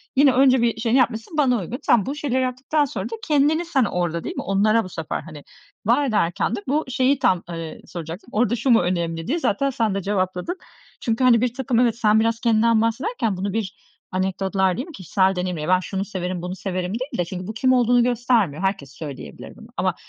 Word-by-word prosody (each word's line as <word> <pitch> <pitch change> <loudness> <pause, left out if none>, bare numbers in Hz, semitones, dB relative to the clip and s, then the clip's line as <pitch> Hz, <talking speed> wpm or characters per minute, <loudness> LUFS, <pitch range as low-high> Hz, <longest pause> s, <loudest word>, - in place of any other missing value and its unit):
yine 275 0 +6
önce 260 -1 +5
bir 230 -1 0
şey 230 0 0
yapmışsın, 250 +2 +1
bana 255 -5 +3
uygun. 230 +9 -5
Sen 215 -5 +3
bu 275 +3 -3
şeyleri 270 -4 -1
yaptıktan 260 +4 0
sonra 205 -8 -5
da 230 - -4
kendini 305 +3 +2
sen 285 -6 +2
orada 175 -3 -2
değil - - -5
mi? - - -3
Onlara 215 +3 +2
bu 185 - -8
sefer, 165 -3 -4
hani, 150 -2 -11 0.4
var 245 +7 +3
ederken 210 -1 0
de - - -4
bu 295 +4 +1
şeyi 260 +1 +1
tam, 190 -10 +2
eee, 165 -2 -6
soracaktım. 170 +5 -8
Orada 235 +1 +1
"Şu 260 - -1
mu 230 -2 +6
önemli?", 170 -2 -2
diye 330 +6 0
zaten 275 0 +1
sen 225 -6 0
de 195 - -1
cevapladın. 185 - -2 0.4
Çünkü, 230 +2 0
hani, 240 -3 +5
birtakım, 250 0 0
evet, 240 -2 +3
sen 215 -2 +4
biraz 225 +1 +1
kendinden 230 -1 +3
bahsederken 230 - -1
bunu 195 +1 -3
bir 210 -4 -5 0.2
anekdotlar 190 0 0
değil 255 - -3
mi? - - -10
Kişisel 190 - +1
deneyimle 180 -4 -3
ben 185 0 +4
şunu 195 +1 -4
severim, 185 -3 -4
bunu 180 +1 -5
severim 185 -1 -3
değil 255 +3 -5
de 175 - 0
çünkü 180 +1 -6
bu 215 - -4
kim 255 +4 +2
olduğunu 245 -1 +4
göstermiyor, 235 - +1
herkes 190 -8 -2
söyleyebilir 135 - -9
bunu - - -14
ama - - 0
220 Hz, 210 wpm, -22 LUFS, 185-250 Hz, 0.4 s, yine